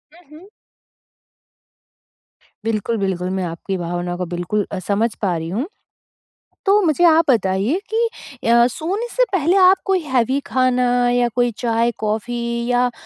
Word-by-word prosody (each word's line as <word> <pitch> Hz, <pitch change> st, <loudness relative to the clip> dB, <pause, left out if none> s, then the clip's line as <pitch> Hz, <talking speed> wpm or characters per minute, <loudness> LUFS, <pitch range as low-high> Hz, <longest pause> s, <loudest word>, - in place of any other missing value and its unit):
हुँ, 350 Hz, -3 st, -20 dB
हुँ। 380 Hz, +4 st, -17 dB, 2.2 s
बिल्कुल, 225 Hz, +1 st, -1 dB
बिल्कुल। 185 Hz, -3 st, -2 dB
मैं 190 Hz, 0 st, -2 dB
आपकी 175 Hz, +3 st, -4 dB
भावनाओं 175 Hz, 0 st, -3 dB
को 180 Hz, -, -3 dB
बिल्कुल 175 Hz, +4 st, -1 dB
अ, 195 Hz, -, -3 dB
समझ 205 Hz, +5 st, 0 dB
पा 185 Hz, -4 st, 0 dB
रही 160 Hz, +1 st, -5 dB
हूँ। 235 Hz, -, -2 dB, 1.0 s
तो 400 Hz, +2 st, +5 dB
मुझे 340 Hz, -1 st, +2 dB
आप 330 Hz, -1 st, +6 dB
बताइए 210 Hz, -, +1 dB
कि 460 Hz, +1 st, +1 dB, 0.4 s
अ, 235 Hz, 0 st, +6 dB
सोने 365 Hz, -, -3 dB
से -, -, +3 dB
पहले 360 Hz, 0 st, +2 dB
आप 375 Hz, 0 st, +6 dB
कोई 385 Hz, -2 st, +1 dB
हेवी 260 Hz, +1 st, +1 dB
खाना 255 Hz, -1 st, +1 dB, 0.2 s
या 245 Hz, 0 st, +2 dB
कोई 245 Hz, -1 st, +2 dB
चाय, 230 Hz, 0 st, +1 dB
कॉफ़ी 235 Hz, +2 st, -2 dB
या 245 Hz, 0 st, +2 dB
235 Hz, 145 wpm, -20 LUFS, 195-310 Hz, 2.2 s, आप